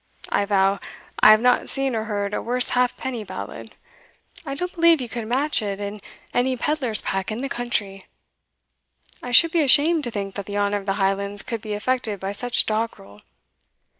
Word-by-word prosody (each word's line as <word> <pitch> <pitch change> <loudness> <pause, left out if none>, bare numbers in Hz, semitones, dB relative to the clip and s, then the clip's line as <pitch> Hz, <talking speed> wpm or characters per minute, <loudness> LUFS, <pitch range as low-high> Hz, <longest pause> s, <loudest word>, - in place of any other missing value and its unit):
I 200 - +1
vow, 195 -1 +2 0.4
I - - +8
have 215 0 +7
not 250 0 +2
seen 270 -2 -1
or 220 0 -2
heard 205 -2 -3
a - - -1
worse 245 +1 +2
halfpenny 250 -1 -1
ballad; 110 - -8 0.7
I 275 -3 -5
don't 360 +5 -4
believe 335 -2 +4
you 250 - -4
could 230 -1 -5
match 270 +3 0
it 200 -2 -4
in 205 0 -6 0.3
any 255 +1 +1
pedlar's 260 -5 +1
pack 195 +2 -2
in 220 +3 -4
the 275 - -2
country. 210 -6 -3 1.1
I 245 - -6
should 325 +7 +5
be 335 - +2
ashamed 300 +3 +4
to - - -3
think 200 -3 -5
that 200 -1 -6
the 205 0 -4
honour 205 0 +1
of 200 0 -9
the 195 - +1
Highlands 200 +1 -1
could 230 -3 -5
be 210 -1 -4
affected 220 -2 -1
by 195 +1 -4
such 245 +4 +2
doggrel. 215 - -4
220 Hz, 190 wpm, -23 LUFS, 200-255 Hz, 1.1 s, I